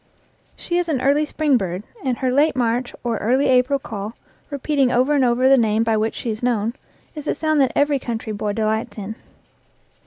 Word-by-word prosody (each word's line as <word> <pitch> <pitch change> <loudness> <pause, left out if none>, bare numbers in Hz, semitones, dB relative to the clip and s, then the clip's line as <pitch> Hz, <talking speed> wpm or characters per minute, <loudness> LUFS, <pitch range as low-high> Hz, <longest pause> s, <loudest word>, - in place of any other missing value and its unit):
She 345 0 -2
is 350 -1 -2
an 285 -5 0
early 285 +4 +2
spring 295 -4 +2
bird, 185 -2 -4 0.2
and 250 -2 -1
her 255 -2 0
late 290 +2 +3
March 245 0 -1
or 235 -2 -1
early 255 +6 +2
April 255 +2 +3
call, 215 -4 -6 0.3
repeating 280 -2 0
over 255 +4 +2
and 280 -2 +3
over 250 +1 +3
the 270 0 +6
name 220 -1 +2
by 225 -1 +1
which 215 +1 -1
she 235 - -3
is 215 - -6
known, 230 -2 0 0.4
is 300 -1 -8
a - - 0
sound 310 -2 +1
that 265 - +2
every 285 -1 +2
coun 235 -3 -3
try 220 -1 -6
boy 205 0 -2
delights 220 +1 -1
in. 210 +1 -5
250 Hz, 210 wpm, -21 LUFS, 220-280 Hz, 0.4 s, the